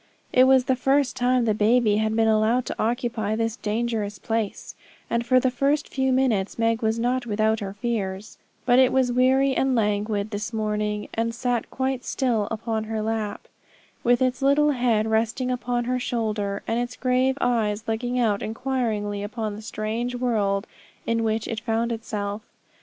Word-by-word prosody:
It 255 Hz, 0 st, +6 dB
was 260 Hz, -1 st, +5 dB
the 260 Hz, -, +2 dB
first 270 Hz, +1 st, +1 dB
time 250 Hz, 0 st, +2 dB
the 220 Hz, -, +2 dB
baby 215 Hz, 0 st, +3 dB
had 220 Hz, 0 st, 0 dB
been 225 Hz, 0 st, +3 dB
allowed 220 Hz, +3 st, +2 dB
to -, -, -4 dB
occupy 230 Hz, -2 st, -1 dB
this 225 Hz, 0 st, -1 dB
dangerous 215 Hz, -2 st, -2 dB
place, 225 Hz, +1 st, -3 dB, 0.4 s
and 235 Hz, 0 st, +1 dB
for 255 Hz, +2 st, +4 dB
the 255 Hz, 0 st, +1 dB
first 280 Hz, +4 st, +1 dB
few 265 Hz, -1 st, 0 dB
minutes 245 Hz, -7 st, +1 dB
Meg 230 Hz, 0 st, +1 dB
was 220 Hz, 0 st, +1 dB
not 245 Hz, +1 st, 0 dB
without 220 Hz, 0 st, +1 dB
her 195 Hz, -2 st, -5 dB
fears; 205 Hz, -2 st, -4 dB, 0.3 s
but 245 Hz, 0 st, +5 dB
it 260 Hz, -1 st, +5 dB
was 260 Hz, -2 st, +2 dB
weary 260 Hz, +2 st, +3 dB
and 265 Hz, 0 st, +1 dB
languid 210 Hz, -1 st, 0 dB
this 210 Hz, +2 st, -4 dB
morning, 210 Hz, -1 st, -2 dB
and 230 Hz, +1 st, -1 dB
sat 245 Hz, -1 st, -1 dB
quite 260 Hz, -1 st, -2 dB
still 230 Hz, -6 st, 0 dB
upon 225 Hz, 0 st, -3 dB
her 220 Hz, 0 st, -3 dB
lap, 220 Hz, -2 st, -3 dB, 0.6 s
with 245 Hz, +1 st, +3 dB
its 255 Hz, +1 st, 0 dB
little 290 Hz, +2 st, +4 dB
head 240 Hz, -5 st, +1 dB
resting 230 Hz, +3 st, 0 dB
upon 245 Hz, -1 st, -1 dB
her 250 Hz, +1 st, -1 dB
shoulder, 215 Hz, -5 st, -2 dB
and 230 Hz, +1 st, 0 dB
its 245 Hz, +1 st, -3 dB
grave 255 Hz, +1 st, +1 dB
eyes 220 Hz, -3 st, 0 dB
looking 245 Hz, +3 st, -1 dB
out 215 Hz, -4 st, +1 dB
inquiringly 220 Hz, -4 st, -2 dB
upon 215 Hz, 0 st, -4 dB
the 215 Hz, -, -8 dB
strange 225 Hz, +2 st, -3 dB
world 215 Hz, -5 st, 0 dB, 0.4 s
in 230 Hz, 0 st, 0 dB
which 220 Hz, 0 st, -1 dB
it 225 Hz, -, -3 dB
found 230 Hz, 0 st, -1 dB
itself. 210 Hz, -2 st, -4 dB
230 Hz, 175 wpm, -24 LUFS, 215-250 Hz, 0.6 s, It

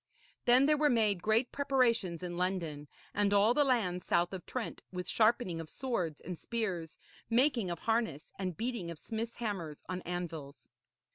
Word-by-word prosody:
Then 250 Hz, +2 st, +7 dB
there 300 Hz, +1 st, +4 dB
were 300 Hz, -1 st, +4 dB
made 215 Hz, -7 st, +2 dB
great 220 Hz, +5 st, +2 dB
preparations 235 Hz, -, +1 dB
in 175 Hz, -1 st, -4 dB
London 170 Hz, -5 st, -1 dB, 0.3 s
and 205 Hz, -1 st, +2 dB
all 205 Hz, +3 st, +5 dB
the 290 Hz, -, +4 dB
lands 210 Hz, -10 st, +1 dB
south 175 Hz, +2 st, +1 dB
of 185 Hz, -3 st, -7 dB
Trent, 255 Hz, -3 st, -4 dB
with 180 Hz, -1 st, -5 dB
sharpening 215 Hz, -7 st, +2 dB
of 160 Hz, -, -9 dB
swords 180 Hz, -, -2 dB
and 180 Hz, -1 st, -6 dB
spears, 190 Hz, -9 st, -3 dB, 0.3 s
making 240 Hz, -4 st, +3 dB
of 170 Hz, -, -2 dB
harness 225 Hz, -8 st, -1 dB
and 185 Hz, -4 st, -3 dB
beating 230 Hz, -7 st, -2 dB
of 170 Hz, -, -6 dB
smiths' 230 Hz, +6 st, -4 dB
hammers 190 Hz, -10 st, -4 dB
on 185 Hz, 0 st, -3 dB
anvils. 165 Hz, -5 st, -6 dB
200 Hz, 165 wpm, -33 LUFS, 175-235 Hz, 0.3 s, Then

